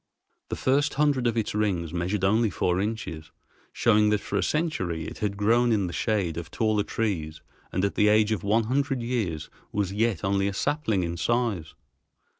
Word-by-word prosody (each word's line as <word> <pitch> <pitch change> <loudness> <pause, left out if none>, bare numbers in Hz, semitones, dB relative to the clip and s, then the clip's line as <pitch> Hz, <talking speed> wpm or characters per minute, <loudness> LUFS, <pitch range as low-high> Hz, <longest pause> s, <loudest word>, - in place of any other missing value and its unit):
The - - -2
first 145 +2 +1
hundred 140 -4 +2
of 115 0 0
its 110 - -1
rings 95 -7 -1
measured 90 +3 -1
only 110 +3 +3
four 90 0 0
inches, 100 -8 -4 0.4
showing 105 -2 +3
that 105 -1 +2
for 100 - -5
a 100 - +2
century 95 - -1
it - - -8
had 100 -2 -2
grown 115 +4 +3
in 105 -4 +2
the 85 - -5
shade 95 -5 0
of 85 -1 -5
taller 110 -2 +1
trees 90 -8 -3 0.3
and 95 +2 0
at 100 - -1
the 105 - +3
age 105 +1 +4
of 105 -6 0
one 110 +4 +2
hundred 135 +2 0
years 105 -11 -2 0.2
was 100 -2 -1
yet 110 -4 0
only 100 0 +1
a 100 - -2
sapling 125 - 0
in 85 0 -3
size. 100 -3 -1
105 Hz, 190 wpm, -26 LUFS, 90-115 Hz, 0.4 s, age